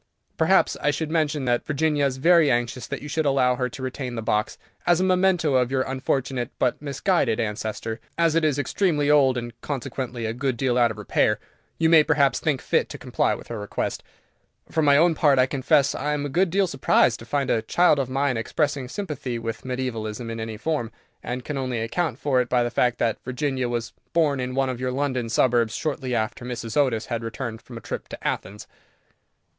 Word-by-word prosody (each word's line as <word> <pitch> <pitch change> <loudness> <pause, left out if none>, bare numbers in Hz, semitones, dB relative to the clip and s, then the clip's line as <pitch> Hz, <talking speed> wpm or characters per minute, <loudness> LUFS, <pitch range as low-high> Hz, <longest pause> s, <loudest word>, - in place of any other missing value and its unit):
Perhaps - - +3
I 150 - +2
should 155 +1 -2
mention 155 -4 0
that 120 -1 +1
Virginia 150 -1 +1
is 130 -1 -4
very 165 +1 +5
anxious 120 +1 -1
that - - -5
you - - -6
should 155 0 0
allow 130 -2 +3
her 125 0 -1
to 135 -2 -9
retain 130 -1 -4
the 115 - -4
box, 105 0 0 0.3
as 175 -1 +4
a - - +2
memento 185 -4 +2
of 125 -2 +3
your 130 -1 +1
unfortunate 130 -2 -2
but 125 - 0
misguided 145 - 0
ancestor. 110 +1 -3 0.2
As 165 -2 +3
it 165 0 +2
is 150 -3 +2
extremely 150 0 +1
old, 135 -4 +4
and 120 -1 -5
consequently 125 -3 -4
a 110 - -2
good 130 0 -2
deal 125 0 +1
out 120 -1 +4
of 110 - -6
repair, 105 - +1 0.4
you 165 - +3
may 160 -1 +7
perhaps 140 -4 +2
think 145 -5 0
fit - - +1
to - - -7
comply - - 0
with - - -12
her 115 -2 -4
request. 105 - -3 0.7
For 160 - +1
my 145 -2 +5
own 170 +2 +5
part, 145 -3 +3
I 130 - +5
confess 135 +1 +2
I 150 0 -2
am 145 -1 -2
a - - -3
good 175 +6 +2
deal 195 +3 +2
surprised 130 -6 +2
to 115 - -10
find 140 +1 0
a 110 - +2
child 155 +6 +3
of 130 -2 -1
mine 135 -1 0
expressing 140 +2 -1
sympathy 145 -9 -4
with 115 -1 -5
mediævalism 120 -3 -4
in 115 - -5
any 110 -1 -5
form, 135 -4 -2 0.3
and 125 0 -5
can 145 -2 -3
only 130 -3 -2
account 120 +10 -1
for 130 -3 +2
it 125 - -4
by 125 -1 +3
the 120 - -2
fact 125 0 +1
that 115 -2 -1
Virginia 130 0 -2
was 120 -1 -3 0.2
born 155 -5 +2
in 125 0 -3
one 135 0 +1
of 125 -2 -4
your 130 0 -1
London 130 -3 -1
suburbs 115 -1 +2
shortly 135 -5 -2
after 115 +3 -2
Mrs. 120 -3 -5
Otis 125 -6 +2
had 115 -1 -3
returned 115 -1 -5
from 120 0 -10
a - - -9
trip - - -6
to - - -6
Athens." 105 +2 -4
130 Hz, 215 wpm, -24 LUFS, 120-150 Hz, 0.7 s, may